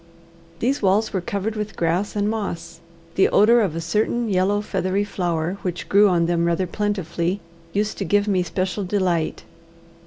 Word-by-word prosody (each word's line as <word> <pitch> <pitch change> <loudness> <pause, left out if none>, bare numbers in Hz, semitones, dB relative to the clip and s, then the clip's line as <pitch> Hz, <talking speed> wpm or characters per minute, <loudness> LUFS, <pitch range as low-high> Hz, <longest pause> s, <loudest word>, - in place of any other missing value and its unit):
These 260 +9 0
walls 205 +2 +2
were 190 - 0
covered 200 +4 -3
with 215 0 -4
grass 175 +5 0
and 205 0 +1
moss. 200 -6 -4 0.3
The 190 - +4
odour 230 +4 +5
of 190 -8 0
a - - -2
certain 220 +6 0
yellow 195 +2 +2
feathery 195 -1 -1
flower, 175 -2 -2
which 180 -2 -4
grew 205 +1 +5
on 170 -2 +2
them 170 0 +1
rather 170 +2 +1
plentifully, 190 -2 -2 0.3
used 210 +3 -1
to - - 0
give 205 +3 +2
me 190 -3 +2
special 185 +3 -2
delight. 180 -4 0
195 Hz, 165 wpm, -22 LUFS, 175-210 Hz, 0.3 s, odour